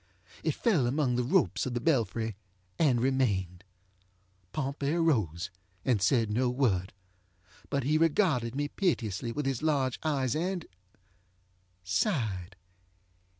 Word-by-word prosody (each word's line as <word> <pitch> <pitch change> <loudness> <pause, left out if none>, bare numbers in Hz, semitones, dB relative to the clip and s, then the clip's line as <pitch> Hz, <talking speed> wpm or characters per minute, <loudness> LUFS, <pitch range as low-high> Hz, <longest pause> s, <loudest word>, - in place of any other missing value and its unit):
It - - 0
fell 175 - +2
among 130 -1 +1
the 125 - +1
ropes 165 +1 +2
of 125 - -3
the - - +1
belfry 115 - 0 0.4
and 135 -7 +4
remained. 100 -9 0 0.9
Pompey 140 +2 -2
arose, 100 - +1 0.3
and 120 -7 +2
said 115 +2 +2
no 125 +3 +2
word. 115 -8 +1 0.8
But 140 -2 0
he 155 +4 +2
regarded 150 - +2
me 145 +1 0
piteously 120 - -1
with 145 +4 -3
his 135 -3 -1
large 140 -5 +1
eyes 135 -6 0 1.5
andŌĆösighed. 95 - -1
130 Hz, 115 wpm, -30 LUFS, 110-145 Hz, 1.5 s, and